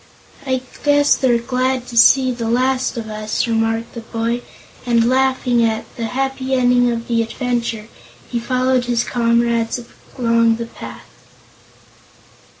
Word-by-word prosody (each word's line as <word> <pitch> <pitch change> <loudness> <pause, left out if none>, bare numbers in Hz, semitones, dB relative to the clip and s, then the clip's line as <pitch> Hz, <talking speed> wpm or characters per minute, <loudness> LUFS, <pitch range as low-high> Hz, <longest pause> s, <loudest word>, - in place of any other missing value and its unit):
"I 260 -1 0 0.2
guess 290 0 +4
they're 250 -3 +2
glad 255 +1 -1
to 240 - -8
see 255 +2 +6
the 235 -2 -3
last 255 +1 0
of 225 -1 -4
us," 215 +1 -2
remarked 225 0 -1
the 235 - -6
boy, 230 +1 -2 0.4
and 235 -1 +2
laughing 255 -2 +2
at 220 -1 0
the 230 - -3
happy 265 +2 -2
ending 245 -1 +3
of 230 0 -4
the 230 -1 +1
adventure, 230 -1 -3 0.4
he 240 - -2
followed 255 +1 +1
his 240 -1 +1
comrades 235 -1 +1 0.4
along 230 -2 +3
the 230 +1 -5
path. - - -10
240 Hz, 140 wpm, -19 LUFS, 230-255 Hz, 0.4 s, see